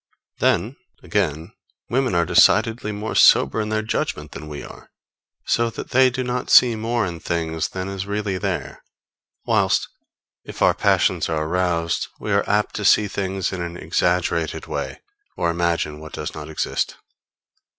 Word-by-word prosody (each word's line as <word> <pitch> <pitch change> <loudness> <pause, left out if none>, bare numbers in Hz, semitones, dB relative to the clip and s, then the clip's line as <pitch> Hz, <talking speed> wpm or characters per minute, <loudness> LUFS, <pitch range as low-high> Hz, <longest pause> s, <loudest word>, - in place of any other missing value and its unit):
Then, 110 +10 +1 0.3
again, 85 -6 -1 0.3
women 130 -4 0
are 85 0 +3
decidedly 110 +4 +3
more 105 +2 -4
sober 110 - +5
in 105 - -3
their 110 0 -1
judgment 110 - -3
than 75 - -9
we 75 -1 -7
are, - - -12 0.6
so 115 0 +1
that 115 - -8
they 130 +1 +5
do 130 +1 -3
not 125 0 -3
see 120 -2 +7
more 115 +1 -1
in 85 -2 -5
things 80 -1 -2
than 95 0 -5
is 100 0 -5
really 100 -2 -2
there; 85 -9 -4 0.6
whilst, - - +2 0.6
if - - -4
our - - +5
passions - - +2
are 80 -1 -1
aroused, 85 -1 0
we 105 - -4
are 100 0 +3
apt 105 +1 +1
to 105 - -4
see 105 +1 +5
things 95 -1 -3
in 90 - -4
an 85 0 -5
exaggerated 85 0 0
way, - - -5 0.4
or 85 - +1
imagine 85 -3 -1
what 80 0 -11
does 75 - -5
not 75 0 -8
exist. 80 - -2
95 Hz, 160 wpm, -22 LUFS, 85-110 Hz, 0.6 s, see